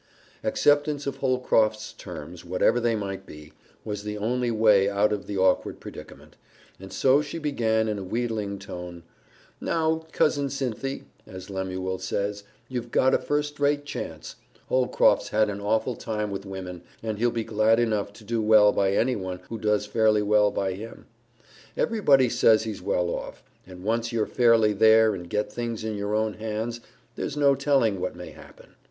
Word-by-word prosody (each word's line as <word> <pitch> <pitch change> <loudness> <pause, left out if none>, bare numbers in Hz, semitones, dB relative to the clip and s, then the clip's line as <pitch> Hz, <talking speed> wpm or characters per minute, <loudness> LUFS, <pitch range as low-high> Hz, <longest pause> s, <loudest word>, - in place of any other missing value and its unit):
Acceptance 145 0 +2
of 140 -1 -3
Holcroft's 115 -5 +1
terms, 85 -1 -9
whatever 90 +7 +2
they 115 -1 +1
might 95 -2 -5
be, 75 0 -12 0.3
was 105 -2 -4
the 105 0 -5
only 120 +4 -1
way 105 -3 +4
out 100 +1 +2
of 100 - -5
the 100 - -4
awkward 95 -1 +1
predicament, - - -12 0.4
and 95 0 -10
so 135 +2 +3
she 150 +2 -6
began 115 -8 0
in 105 -2 -2
a - - -5
wheedling 110 -1 -2
tone, 90 -3 -8 0.6
"Now, 160 0 -1
Cousin 145 -2 +1
Cynthy, 135 0 -3 0.2
as 95 +1 -9
Lemuel 95 -1 -3
says, 100 +2 -3 0.2
you've 125 -2 -5
got 130 - +3
a - - +4
first 145 0 -2
rate 145 0 +1
chance. 145 - -7 0.3
Holcroft's 130 -1 +3
had 105 0 +2
an 100 0 -6
awful 110 +4 0
time 105 -2 -3
with 100 0 -6
women, 90 -2 -7 0.2
and 110 -2 -3
he'll 120 +1 +3
be 115 -1 -2
glad 110 +1 +2
enough 105 -4 0
to 110 - -15
do 115 +1 -1
well 105 -1 +6
by 95 -1 +1
anyone 95 -6 -1
who 115 - -5
does 105 -1 +1
fairly 110 -1 +2
well 105 0 +4
by 95 -2 -2
him. 110 +5 -9 0.7
Everybody 145 - +3
says 110 -2 +4
he's 110 -3 -5
well 90 0 0
off, - - -6 0.2
and 90 -1 -11
once 115 +2 -1
you're 115 -2 0
fairly 115 -3 +3
there 110 +1 +5
and 90 -3 -7
get 105 +3 -2
things 115 -2 -4
in 110 -1 -3
your 100 +1 -2
own 110 0 0
hands, 110 +2 -4 0.3
there's 150 - -4
no 140 -1 +5
telling 135 -7 +1
what 90 - -3
may 90 0 -9
happen. - - -16
110 Hz, 170 wpm, -26 LUFS, 100-120 Hz, 0.7 s, well